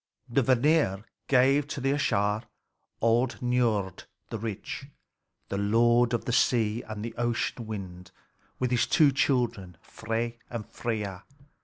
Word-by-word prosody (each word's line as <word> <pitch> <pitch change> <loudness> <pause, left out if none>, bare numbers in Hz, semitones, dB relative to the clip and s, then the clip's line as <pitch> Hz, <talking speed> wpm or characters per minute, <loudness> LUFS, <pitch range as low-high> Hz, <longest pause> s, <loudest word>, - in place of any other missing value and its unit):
The 120 +3 +2
Vanir 125 -5 +2 0.2
gave 135 +2 +4
to 140 - -5
the 135 +1 +1
Æsir 105 -6 +1 0.6
old 120 +3 +2
Niörd 115 -6 0 0.3
the 115 - -3
rich, 110 +5 -5 0.6
the 100 - -2
lord 120 +3 +3
of - - -4
the 120 - -1
sea 115 -2 +2
and 110 0 -5
the 115 - -5
ocean 120 -1 -1
wind, 95 -4 -7 0.5
with 125 -1 -1
his 120 - +2
two 150 -4 +5
children, 120 - 0
Frey 115 +1 -4
and 115 -3 -5
Freia. 105 -7 -4
115 Hz, 135 wpm, -28 LUFS, 105-125 Hz, 0.6 s, two